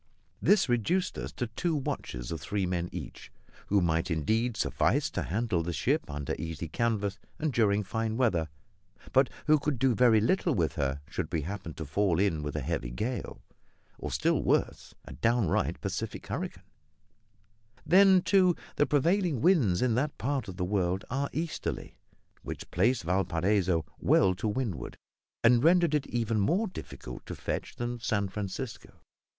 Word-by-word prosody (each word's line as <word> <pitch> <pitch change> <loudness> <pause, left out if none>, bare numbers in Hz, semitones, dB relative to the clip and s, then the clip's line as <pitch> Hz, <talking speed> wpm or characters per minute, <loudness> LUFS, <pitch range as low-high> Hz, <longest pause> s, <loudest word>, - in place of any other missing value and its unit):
This 205 -6 +4
reduced 125 - +1
us - - -5
to 125 - -2
two 155 +9 -2
watches - - -4
of 80 - -4
three 100 -1 -1
men 90 -1 -2
each, - - -8 0.4
who 100 -1 +3
might 80 0 +1
indeed 110 +9 0
suffice - - +1
to - - -2
handle 105 -1 0
the 85 +1 -3
ship 70 -3 0
under 70 -1 -3
easy 80 0 -4
canvas 105 -1 -1 0.2
and 155 -3 -1
during 105 -3 +3
fine 110 +2 -2
weather, 90 -11 +1 0.6
but 135 0 +5 0.2
who 155 0 +5
could 145 -2 -1
do 130 +1 +3
very 115 -2 +5
little 160 - +1
with 85 -5 +1
her 70 -1 -1
should - - -4
we 80 -2 0
happen 95 -2 -6
to 80 - -5
fall 90 +3 +1
in 95 -6 +1
with 75 0 -4
a 75 - -1
heavy 70 -4 -2
gale, 115 - -4 0.6
or, - - -4
still - - +1
worse, - - 0
a - - -9
downright 115 -6 +1
Pacific - - -4
hurricane. - - -5 1.2
Then, 190 +2 +6
too, 185 -3 +4 0.2
the 145 - +3
prevailing 165 - +2
winds 130 - +3
in 125 -3 +2
that 140 +5 -1
part 135 +2 -1
of 95 -2 -8
the 90 - -1
world 95 -1 0
are 140 +2 -1
easterly; 160 +1 -4 0.5
which - - -7
placed 115 +5 +2
Valparaiso 90 -1 +1
well 95 -1 +4
to 105 +5 -3
windward, 105 -4 -3 0.5
and 120 +1 +5
rendered 170 -1 +4
it 150 -2 +1
even 115 -2 0
more 175 - +2
difficult 65 - -8
to - - -5
fetch - - -4
than 120 0 -3
San 100 -4 0
Francisco. 105 +5 -5
110 Hz, 165 wpm, -29 LUFS, 90-135 Hz, 1.2 s, Then